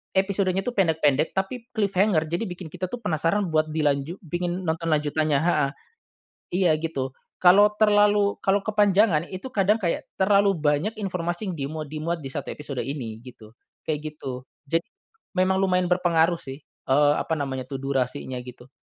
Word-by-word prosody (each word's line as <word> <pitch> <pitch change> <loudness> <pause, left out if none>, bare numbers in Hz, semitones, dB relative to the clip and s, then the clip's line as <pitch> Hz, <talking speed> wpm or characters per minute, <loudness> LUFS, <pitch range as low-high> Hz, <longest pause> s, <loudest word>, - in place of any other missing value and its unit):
episodenya 195 -1 +1
tuh 245 - -2
pendek-pendek 160 - +2
tapi 230 +5 -3
cliffhanger 200 -5 +2
jadi 180 +6 -1
bikin 175 -3 -8
kita 185 - -4
tuh 240 +4 -7
penasaran 165 +3 0
buat 155 0 +2
dilanjut 150 +1 0
pingin 175 +3 -3
nonton 165 0 -2
lanjutannya 150 -1 +1
heeh, 150 -5 +2 0.9
iya 170 - +5
gitu. 135 -5 -3 0.2
Kalau 205 +4 +5
terlalu 205 -1 +3
kalau 195 +1 +1
kepanjangan 205 -5 +3
itu 195 +8 -7
kadang 205 +2 +3
kayak 175 -7 -2
terlalu 200 0 +3
banyak 155 +8 0
informasi 180 -1 -3
yang - - -5
dimuat 155 -1 -6
dimuat 165 +2 -2
di 135 - -5
1 145 - -4
episode 145 -3 -5
ini 120 -6 -5
gitu, 115 -3 -14 0.3
kayak 155 0 -3
gitu. 130 -3 -7 0.2
Jadi, 165 +4 0 0.5
memang 190 +1 +2
lumayan 180 -2 +2
berpengaruh 170 -1 +2
sih, 135 +2 -8
eee, 145 +2 +2
apa 160 - -1
namanya 130 -3 -4
tuh 135 - -4
durasinya 130 -1 -2
gitu. 125 0 -12
165 Hz, 155 wpm, -25 LUFS, 145-195 Hz, 0.9 s, iya